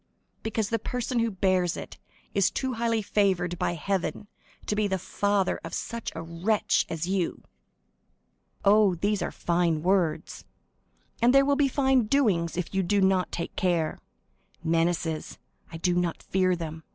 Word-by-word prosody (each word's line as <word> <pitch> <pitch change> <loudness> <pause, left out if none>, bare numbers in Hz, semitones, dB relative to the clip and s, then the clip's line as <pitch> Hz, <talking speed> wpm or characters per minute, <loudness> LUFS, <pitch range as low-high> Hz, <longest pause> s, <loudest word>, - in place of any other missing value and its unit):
"Because 220 -1 -2
the 230 - 0
person 250 0 -2
who 230 0 +2
bears 185 -3 +1
it - - -9 0.3
is 200 -2 +3
too 260 -1 -2
highly 230 -1 0
favored 185 -4 +1
by - - 0
Heaven 195 +4 -2 0.4
to 210 - -1
be 210 0 +1
the 190 -1 0
father 195 +1 0
of - - -5
such 235 -1 -4
a 165 - -5
wretch 170 +6 0
as 165 0 -3
you." 185 -1 -1 1.2
"Oh, 200 -2 +5
these 200 +3 0
are 175 - -2
fine 170 -2 0
words." 180 -4 0 0.8
"And 245 +3 +5
there 275 0 +6
will 285 0 +3
be 285 -1 +3
fine 265 -3 +2
doings, 200 - +1
if 180 +1 -3
you 190 - +2
do 200 +3 +1
not 190 -2 +2
take 170 - -5
care." 175 -5 0 0.6
"Menaces—I 165 0 -2
do 175 +2 +1
not 175 -1 -1
fear 185 -1 +1
them. 160 -2 -6
190 Hz, 155 wpm, -27 LUFS, 170-215 Hz, 1.2 s, there